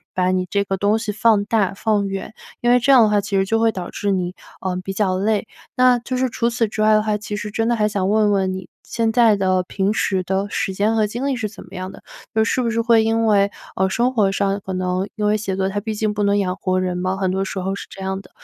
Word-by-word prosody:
把 185 Hz, 0 st, +2 dB
你 185 Hz, -1 st, 0 dB
这 200 Hz, +2 st, +1 dB
个 195 Hz, -1 st, -2 dB
东 205 Hz, +3 st, +2 dB
西 220 Hz, -2 st, -3 dB
放 210 Hz, -1 st, +3 dB
大、 205 Hz, -3 st, +1 dB
放 205 Hz, -1 st, 0 dB
远。 195 Hz, +2 st, -5 dB, 0.3 s
因 240 Hz, -, +3 dB
为 250 Hz, -, +5 dB
这 275 Hz, +3 st, +3 dB
样 255 Hz, -4 st, +8 dB
的 215 Hz, -, +3 dB
话 205 Hz, -1 st, +2 dB
其 200 Hz, 0 st, -2 dB
实 195 Hz, -, +2 dB
就 225 Hz, +3 st, +1 dB
会 225 Hz, 0 st, +3 dB
导 185 Hz, -4 st, -6 dB
致 205 Hz, -, -2 dB
你， 180 Hz, -2 st, -1 dB, 0.3 s
呃， 185 Hz, -1 st, -2 dB
比 195 Hz, -, -4 dB
较 190 Hz, -2 st, 0 dB
累。 210 Hz, +1 st, 0 dB, 0.3 s
那， 250 Hz, -1 st, +4 dB
就 255 Hz, +2 st, -4 dB
是 255 Hz, 0 st, +1 dB
除 235 Hz, +1 st, 0 dB
此 235 Hz, -1 st, 0 dB
之 215 Hz, +1 st, -4 dB
外 215 Hz, 0 st, +5 dB
的 215 Hz, -, +3 dB
话， 215 Hz, -1 st, 0 dB
其 210 Hz, 0 st, -6 dB
实 210 Hz, 0 st, -5 dB
真 225 Hz, +2 st, -1 dB
的 240 Hz, -, +2 dB
还 210 Hz, -2 st, +2 dB
想 195 Hz, -2 st, -1 dB
问 210 Hz, 0 st, +3 dB
问 190 Hz, -2 st, +1 dB
你 185 Hz, -1 st, -7 dB, 0.2 s
现 230 Hz, -1 st, -1 dB
在 230 Hz, -2 st, +5 dB
的 185 Hz, -2 st, +1 dB
平 195 Hz, +3 st, -1 dB
时 190 Hz, -3 st, 0 dB
的 190 Hz, +2 st, -1 dB
时 -, -, -1 dB
间 210 Hz, +4 st, +1 dB
和 215 Hz, -1 st, +2 dB
精 240 Hz, +6 st, -4 dB
力 275 Hz, -, 0 dB
是 220 Hz, -4 st, -3 dB
怎 215 Hz, -, -12 dB
么 -, -, -17 dB
样 185 Hz, +1 st, -5 dB
的， -, -, -14 dB, 0.3 s
就 220 Hz, -, +4 dB
是 255 Hz, -, 0 dB
不 235 Hz, -, 0 dB
是 230 Hz, +1 st, 0 dB
会 230 Hz, -1 st, +4 dB
因 225 Hz, +1 st, +1 dB
为， 200 Hz, -2 st, +3 dB, 0.3 s
呃， 190 Hz, 0 st, +1 dB
生 245 Hz, +6 st, +1 dB
活 205 Hz, -5 st, +2 dB
上 195 Hz, 0 st, -1 dB
可 190 Hz, -, -4 dB
能 185 Hz, +1 st, -1 dB
因 210 Hz, -, -2 dB
为 210 Hz, 0 st, +3 dB
写 195 Hz, -3 st, -3 dB
作 190 Hz, 0 st, +1 dB
它 205 Hz, +1 st, -2 dB
毕 220 Hz, +1 st, -4 dB
竟 210 Hz, 0 st, -1 dB
不 210 Hz, -, -3 dB
能 200 Hz, 0 st, +2 dB
养 185 Hz, -2 st, 0 dB
活 185 Hz, -1 st, -1 dB
人 185 Hz, -1 st, -1 dB
嘛， 185 Hz, +1 st, -1 dB
很 190 Hz, -1 st, 0 dB
多 190 Hz, +1 st, 0 dB
时 195 Hz, -, -6 dB
候 190 Hz, +1 st, -2 dB
是 -, -, -8 dB
这 -, -, -12 dB
样 190 Hz, 0 st, -3 dB
的， 180 Hz, -, -19 dB
205 Hz, 310 characters per minute, -20 LUFS, 190-220 Hz, 0.3 s, 样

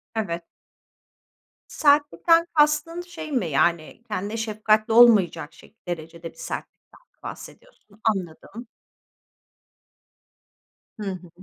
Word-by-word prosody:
Evet. 170 Hz, -6 st, -3 dB, 1.3 s
Sertlikten 310 Hz, +3 st, +3 dB
kastın 300 Hz, +3 st, +2 dB
şey 345 Hz, -3 st, -9 dB
mi, 245 Hz, -11 st, 0 dB
yani, 170 Hz, +8 st, 0 dB
kendine 210 Hz, +1 st, -4 dB
şefkatli 215 Hz, 0 st, +1 dB
olmayacak 205 Hz, -10 st, +5 dB
şek 205 Hz, +3 st, -21 dB
derecede 165 Hz, 0 st, -6 dB
bir -, -, -27 dB
sertlikten -, -, -8 dB
mi -, -, -46 dB
bahsediyorsun? 215 Hz, -, -12 dB
Anladım. 205 Hz, +3 st, -3 dB, 2.3 s
Hı -, -, -5 dB
hı. 180 Hz, -2 st, -9 dB
215 Hz, 95 wpm, -24 LUFS, 175-290 Hz, 2.3 s, olmayacak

